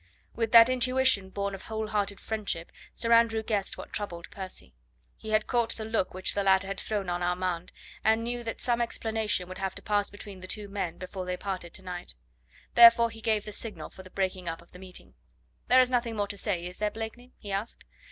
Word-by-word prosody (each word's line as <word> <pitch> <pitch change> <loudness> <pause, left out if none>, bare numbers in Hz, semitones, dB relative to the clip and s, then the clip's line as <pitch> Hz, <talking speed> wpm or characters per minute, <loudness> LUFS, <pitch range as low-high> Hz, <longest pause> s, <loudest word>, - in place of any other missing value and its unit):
With 225 -1 -1
that 230 0 +10
intuition 255 -5 +3
born 200 +1 -3
of 195 - -7
whole 220 -1 -4
hearted 205 -2 -1
friendship 210 -6 -3 0.2
Sir 230 - -1
Andrew 230 -1 +4
guessed 205 -3 -1
what - - -9
troubled 175 -5 -4
Percy. 185 - -8 0.4
He 220 - -9
had 215 0 +3
caught 235 -2 +1
the 220 - -4
look 220 -4 0
which 185 - 0
the 200 - 0
latter 195 0 +4
had 195 0 -4
thrown 205 -3 -2
on 175 0 -1
Armand, 180 -1 -1 0.3
and 220 +1 +3
knew 240 +1 -3
that 225 - -5
some 240 -1 +2
explanation 220 -5 0
would 185 +1 -8
have 190 -1 -2
to - - -9
pass 205 -1 +1
between 205 -1 -10
the 185 - -9
two 210 +1 -3
men 195 -4 -3
before 185 0 -6
they 180 0 -2
parted 185 -4 -5
to 190 - -5
night. 180 - -5 0.6
Therefore 235 0 +8
he 225 0 -10
gave 215 -2 +1
the 210 - -6
signal 220 +1 -4
for - - -11
the 185 - -13
breaking 185 -2 -2
up 165 - -5
of 170 - -25
the 180 - -12
meeting. 185 - -10 0.5
"There 255 +1 +7
is 255 0 +1
nothing 235 -2 +1
more 205 -1 0
to - - -3
say, 190 -4 -1
is 180 +1 -8
there, 210 0 +1
Blakeney?" 225 +3 -7
he 205 - -8
asked. 200 +4 -3
205 Hz, 220 wpm, -29 LUFS, 185-225 Hz, 0.6 s, that